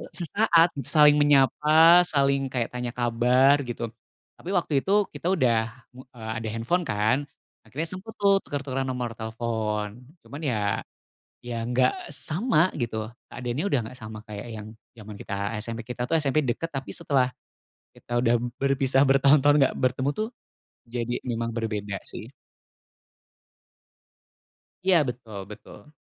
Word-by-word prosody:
sesaat 175 -1 +3
saling 150 +2 +5
menyapa, 150 +4 +6
saling 140 -2 +2
kayak 120 -3 -2
tanya 125 -1 -3
kabar, 125 +4 +3
gitu, 120 -2 -4 0.5
tapi 180 - -10
waktu 165 -7 +1
itu 205 0 +2
kita 180 - -3
udah, 115 -9 +2 0.2
eee, 125 -4 -9
ada - - -3
handphone, 115 +11 -1
kan, 110 +2 +1 0.4
akhirnya 160 +5 -4
sempat, 185 +6 -6
tuh, 200 -1 +3
tuker-tukeran 135 -2 -3
nomor 125 -3 -4
telepon, 110 -1 -3 0.2
cuman, 145 0 -10
ya 125 -7 0 0.8
ya 115 -2 -4
nggak 125 +1 +1
sama, 165 - +1
gitu, 110 -3 -3 0.2
keadaannya, 125 +6 -4
udah 160 -9 +2
nggak 125 - -10
sama 110 -2 -9
kayak 105 0 -8 0.2
yang - - -10 0.3
jaman 105 -3 -11
kita 100 - -6 0.2
SMP. 115 +2 -4
Kita, 125 +2 -5
tuh, - - -1
SMP 150 -2 +2
dekat, 150 +4 -1
tapi 135 -3 -5
setelah 135 -6 +1 0.6
kita 120 0 -4
udah 120 -1 +2 0.2
berpisah 135 0 +2
bertahun-tahun 140 +2 +5
nggak 135 - +2
bertemu, 130 +2 0
tuh, 215 - -1 0.6
jadi 120 0 -3
memang 115 -1 -2
berbeda, 105 -3 -3
sih. 115 +5 -8 2.5
Iya, 185 -1 +4
betul 115 -4 -7
betul. 105 +6 -13
130 Hz, 135 wpm, -25 LUFS, 115-150 Hz, 2.5 s, menyapa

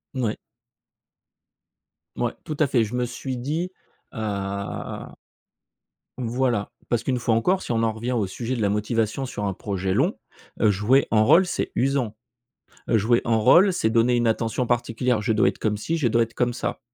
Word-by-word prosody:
N 130 - -1
ouais. 110 - 0 1.8
Mouais, 120 -1 -1
tout 155 -2 -5
à 150 - +4
fait. 120 -3 +2
Je 110 +3 -4
me 125 - 0
suis 125 +1 -5
dit, 160 +8 -2 0.4
heu - - -10 2.0
Voilà, 120 -3 -1 0.2
parce 120 -1 0
qu'une 130 -2 0
fois 115 -1 +1
encore, 180 +12 +2
si - - -4
on 115 0 +1
en 115 - +2
revient 120 +3 -4
au 110 -6 0
sujet 120 +6 -4
de 115 - -3
la 100 - +2
motivation 110 +4 -1
sur 105 -5 -4
un 100 - -1
projet 95 -1 -2
long, 150 - +1 0.4
heu, 110 - +5
jouer 110 +8 +3
un 110 -1 +4
rôle, 170 +12 +6
c'est 180 - -3
usant, 130 -4 0 0.7
heu, 115 - +3
jouer 120 +3 +3
un 115 -1 +2
rôle, 180 - +6
c'est 110 -11 0
donner 120 +1 +3
une 120 -1 +2
attention 115 +2 0
particulière. 120 0 0
Je 110 +2 0
dois 105 -1 +3
être - - -4
comme 105 -1 0
ci, 160 +11 -2
je 135 -7 +1
dois 115 +1 +3
être 115 0 -4
comme 125 -1 +1
ça. - - -3
120 Hz, 190 wpm, -24 LUFS, 110-130 Hz, 2.0 s, rôle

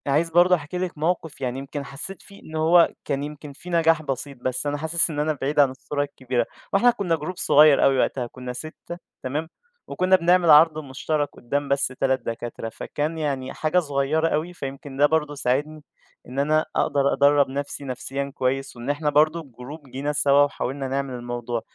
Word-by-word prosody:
أنا 140 - +2
عايز 165 +3 +2
برضه 175 +2 +5
أحكي 165 +1 -6
لِك 180 -3 -3
موقف 160 -2 -2
يعني 130 0 -2
يمكن 140 +1 -6
حسّيت 145 +8 -7
فيه 200 - -16
إن 160 - -10
هو 165 +2 +4
كان 140 -1 -2
يمكن 150 0 -8
في 180 - -12
نجاح 165 -2 +3
بسيط، 140 -1 -5
بس 130 +3 -3
أنا 145 0 -1
حاسس 160 +3 +1
إن 150 -2 -4
أنا 155 +1 +1
بعيد 145 +2 0
عن 140 -2 +6
الصورة 145 +2 -3
الكبيرة. 130 -4 -2 0.3
وإحنا 240 +5 +5
كُنّا 190 -7 -1
جروب 160 +4 -6
صغير 150 -1 +5
أوي 135 -1 +4
وقتها، 125 -2 0
كُنّا 125 +1 -7
6 155 +5 -8 0.3
تمام؟ 150 +5 -3 0.4
وكُنّا 185 +1 +3
بنعمل 175 -1 +3
عَرْض 155 +1 +7
مُشترَك 145 +2 -2
قُدّام 140 +4 -3
بس 140 0 +2
3 130 +1 0
دكاترة، 115 0 -5
فكان 150 +7 -4
يعني 135 -4 -2
حاجة 155 +3 +1
صغيرة 150 +1 0
أوي، 165 +3 -1
فيمكن 135 -3 -7
ده 145 - +5
برضه 150 -1 0
ساعدني 145 +3 -1 0.4
إن 130 +2 -5
أنا 155 +2 +2
أقدر 140 -1 +2
أدرّب 140 +1 +4
نفسي 140 +1 -5
نفسيًا 135 +2 -4
كويس 135 +1 -1
وإن 120 +3 -6
إحنا 145 +1 0
برضه 155 +3 +3
الجروب 140 +1 -11
جينا 140 +3 -3
سَوا 145 -1 +4
وحاولنا 140 -1 -3
نعمل 135 0 -2
الموضوع. 120 -1 -4
145 Hz, 190 wpm, -24 LUFS, 135-160 Hz, 0.4 s, عَرْض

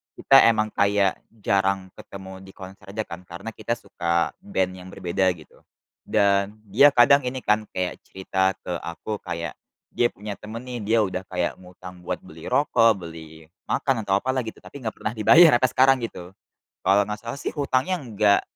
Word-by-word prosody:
kita 135 0 +6
emang 110 -2 +2
kayak 100 -1 +1
jarang 95 -3 0
ketemu 95 -1 -10
di 95 - -13
konser 95 0 -12
aja 110 +1 -2
kan 85 -1 -9
karena 85 +6 -7
kita 115 - -3
suka 85 -6 -1
band 95 - -1
yang 90 0 -11
berbeda 95 +2 0
gitu, 75 -3 -18 0.5
dan 100 0 +2
dia 120 +9 +6
kadang 140 +4 +6
ini 130 +1 -3
kan 105 0 +1
kayak 90 -1 -3
cerita 95 0 -1
ke 90 -2 -4
aku, 100 +5 -6
kayak 85 0 -5 0.4
dia 120 - +2
punya 105 0 -7
temen 110 +3 -8
nih 125 -1 -6
dia 110 +3 +2
udah 95 -1 -3
kayak 90 -2 -2
ngutang 90 0 -12
buat - - -3
beli 80 0 -11
rokok, 115 -8 +3
beli 80 -1 -11 0.2
makan, 130 -7 0
atau 95 - +3
apalah 130 0 -1
gitu, 110 - -8
tapi 140 - -11
nggak 110 - -4
pernah 105 - -3
dibayar 155 +9 +7
sampai 130 - +2
sekarang 135 +1 +5
gitu. 90 -6 -7 0.6
Kalau 100 +1 +5
nggak 105 0 -4
salah 115 +3 -6
sih - - -3
hutangnya 140 +3 0
nggak 105 -6 +2
100 Hz, 180 wpm, -24 LUFS, 95-115 Hz, 0.6 s, dibayar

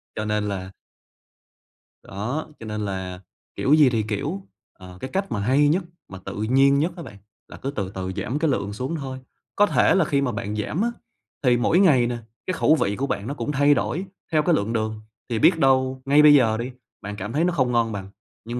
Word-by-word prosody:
Cho 110 - -3
nên 105 0 0
là 95 -1 -5 1.3
Đó, 115 +11 -4
cho 115 - -9
nên 105 -1 -3
là, 95 -2 -5 0.3
kiểu 140 - +2
gì 150 -3 +6
thì 115 -3 0
kiểu, 100 -2 -4 0.3
ờ, 90 -1 -13
cái 130 - -5
cách 195 +1 -2
mà 105 - -1
hay 135 +8 +3
nhất 175 +6 +2 0.2
mà 95 - -10
tự - - -6
nhiên 135 +5 +4
nhất 165 +5 +1
á 170 - -7
bạn 100 - -11 0.3
là - - -11
cứ 135 - -4
từ 100 -9 -3
từ 95 -1 -5
giảm 120 +8 -3
cái 160 0 +1
lượng 100 -5 -2
xuống 130 +10 -3
thôi. 135 -4 -5 0.4
Có 205 - +5
thể - - +3
là 190 -4 +3
khi 140 -1 +1
mà 135 -3 0
bạn 105 -1 -4
giảm 110 - -2
á 235 +2 +1 0.5
thì 125 -2 +4
mỗi 160 +8 +2
ngày 140 -11 +5
nè 120 0 -3 0.3
cái 185 - -1
khẩu 155 -3 +3
vị 100 -9 0
của 135 +5 -2
bạn 105 -4 -3
nó 140 - -3
cũng 150 - -3
thay 145 +1 +4
đổi 155 +8 -2 0.3
theo 155 -2 +3
cái 170 +1 +3
lượng 110 -1 -1
đường, 110 -1 -2 0.3
thì 115 -2 -1
biết 170 +9 +5
đâu 130 -2 +2
ngay 145 +2 +5
bây 150 -1 +8
giờ 115 -6 +4
đi 120 +3 -4 0.3
bạn 105 0 -6
cảm 105 +3 -6
thấy 155 +4 +1
nó 180 0 +1
không 130 -6 +1
ngon 115 -1 +1
bằng, 95 -2 -6 0.4
nhưng 120 +2 -4
125 Hz, 230 wpm, -23 LUFS, 105-145 Hz, 1.3 s, bây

